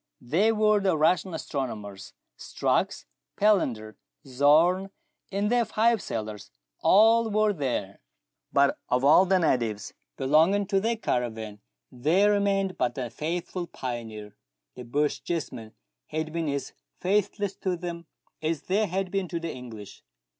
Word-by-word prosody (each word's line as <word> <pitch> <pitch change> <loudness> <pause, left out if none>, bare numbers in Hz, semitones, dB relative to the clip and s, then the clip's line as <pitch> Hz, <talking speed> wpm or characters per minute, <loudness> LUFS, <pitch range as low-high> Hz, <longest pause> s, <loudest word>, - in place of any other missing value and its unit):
They 165 - +2
w^ere 215 -1 +3
the 190 -4 +2
Russian 175 +3 +2
astronomers. 105 -10 -5 0.2
Strux, - - -1 0.3
Palander, 125 - +1 0.3
Zorn, 155 +8 +3 0.4
and 200 +2 0
their 245 -1 +3
five 225 -1 +2
sailors, 105 -2 -5 0.3
all 225 +3 +5
were 215 0 +2
there: 125 - -3 0.5
but 140 0 +3
of 125 +2 +1
all 160 +6 +6
the 190 0 +4
natives 120 - 0 0.2
belonging 160 +9 +3
to 195 0 +1
their 225 +3 0
caravan 110 - -3 0.3
there 170 +11 +3
remained 195 -2 0
but 125 -1 0
the 125 -4 -4
faithful 175 +5 -4
pioneer. 115 -7 -6 0.4
The 125 - -9
Bochjesmen 145 -3 -2 0.3
had 155 0 -4
been 165 -2 -1
as 140 -1 -3 0.3
faithless 200 +1 0
to 185 -2 -2
them 170 -1 -6 0.3
as 160 -1 -2
they 205 +3 +1
had 190 0 -2
been 195 -2 -1
to 170 0 -3
the 165 0 -4
English. 115 -5 -10
165 Hz, 130 wpm, -27 LUFS, 125-195 Hz, 0.5 s, all